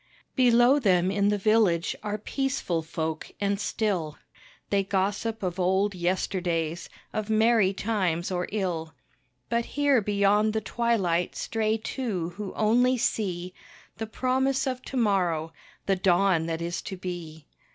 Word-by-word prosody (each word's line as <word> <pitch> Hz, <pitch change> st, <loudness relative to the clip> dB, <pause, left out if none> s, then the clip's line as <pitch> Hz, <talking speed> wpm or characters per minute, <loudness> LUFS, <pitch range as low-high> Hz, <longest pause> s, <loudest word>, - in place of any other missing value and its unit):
Below 245 Hz, +2 st, +5 dB
them 185 Hz, -6 st, +3 dB
in 200 Hz, 0 st, +2 dB
the 205 Hz, -, +1 dB
village 205 Hz, -5 st, +2 dB
are 210 Hz, 0 st, -3 dB
peaceful 260 Hz, -7 st, -2 dB
folk 160 Hz, 0 st, -4 dB
and 200 Hz, -1 st, 0 dB
still, 185 Hz, -9 st, -1 dB, 0.5 s
They 200 Hz, -1 st, +3 dB
gossip 200 Hz, +3 st, -1 dB
of 180 Hz, 0 st, -2 dB
old 190 Hz, +3 st, +2 dB
yesterdays, 175 Hz, -2 st, -1 dB, 0.2 s
of 215 Hz, 0 st, -3 dB
merry 220 Hz, -2 st, +4 dB
times 190 Hz, -5 st, -1 dB
or 180 Hz, -1 st, -1 dB
ill. 170 Hz, -6 st, -2 dB, 0.5 s
But 235 Hz, 0 st, 0 dB
here 285 Hz, -4 st, +4 dB
beyond 205 Hz, +1 st, +2 dB
the 220 Hz, -, 0 dB
twilight 200 Hz, -6 st, 0 dB
stray 220 Hz, -1 st, 0 dB
two 215 Hz, -7 st, -3 dB
who 200 Hz, +3 st, -6 dB
only 245 Hz, +4 st, +3 dB
see 185 Hz, -6 st, -2 dB, 0.4 s
The 225 Hz, -, -4 dB
promise 260 Hz, +3 st, 0 dB
of 255 Hz, -1 st, -2 dB
to 265 Hz, -, -5 dB
morrow 175 Hz, -8 st, +1 dB, 0.3 s
the 195 Hz, -1 st, +1 dB
dawn 180 Hz, -2 st, +3 dB
that 165 Hz, 0 st, -3 dB
is 170 Hz, +1 st, -3 dB
to 190 Hz, -, -7 dB
be. 170 Hz, -4 st, -7 dB
200 Hz, 140 wpm, -27 LUFS, 175-225 Hz, 0.5 s, Below